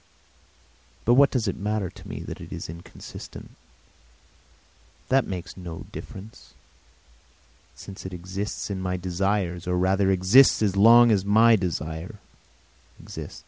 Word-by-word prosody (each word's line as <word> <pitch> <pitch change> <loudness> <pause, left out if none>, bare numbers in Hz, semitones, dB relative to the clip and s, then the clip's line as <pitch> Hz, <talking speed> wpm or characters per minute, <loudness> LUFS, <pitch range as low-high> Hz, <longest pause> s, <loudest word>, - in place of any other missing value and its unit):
But 120 - +5
what 140 +2 +6
does 120 -5 -1
it 95 - -1
matter 105 -2 -2
to - - -14
me - - -6
that - - -8
it - - -10
is - - -6
inconsistent? 85 +1 -10 1.6
That 130 -1 +3
makes 95 -1 -6
no 85 -3 -8
difference 100 +3 -11 1.2
since 95 - -10
it 95 - -7
exists 95 +4 -5
in 95 -1 -4
my 90 0 -2
desires, 90 -1 -2
or 90 0 0
rather 95 +2 +2
exists 95 +7 +5
as 100 -2 +1
long 115 +3 +7
as 100 -3 +2
my 110 +3 +5
desires 85 -1 -4 0.8
exist. - - -9
95 Hz, 135 wpm, -25 LUFS, 90-110 Hz, 1.6 s, long